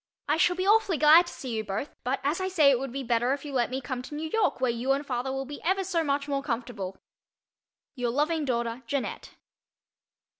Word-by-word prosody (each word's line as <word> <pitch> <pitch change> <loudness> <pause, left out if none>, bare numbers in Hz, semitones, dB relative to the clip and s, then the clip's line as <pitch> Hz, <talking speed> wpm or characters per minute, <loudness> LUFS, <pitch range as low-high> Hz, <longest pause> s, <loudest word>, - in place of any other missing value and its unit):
I 300 - +2
shall 355 +1 +3
be 370 +1 -2
awfully 410 -4 +4
glad 315 +4 +7
to - - -7
see 260 - -6
you 220 - -1
both 215 +7 -4
but 255 +2 -1
as 300 +6 0
I 375 - 0
say 315 -7 +5
it 255 - +2
would 270 -1 -4
be 275 +2 -4
better 240 +1 +1
if 285 +1 -5
you 285 - -6
let 245 -2 +1
me 260 +1 -2
come 255 -1 -4
to 280 +3 -8
New 315 +1 -4
York 445 -10 +1
where 255 -2 +2
you 245 +3 0
and 280 +2 -2
father 255 0 -2
will 270 0 -3
be 290 +2 -8
ever 385 +3 +1
so 350 -3 0
much 280 -1 -1
more 280 -1 -1
comfortable. 230 -7 -4 1.0
Your 245 -4 -2
loving 300 +5 0
daughter, 235 -2 -2
JEANNETTE. 280 +2 -4
275 Hz, 230 wpm, -27 LUFS, 245-315 Hz, 1.0 s, glad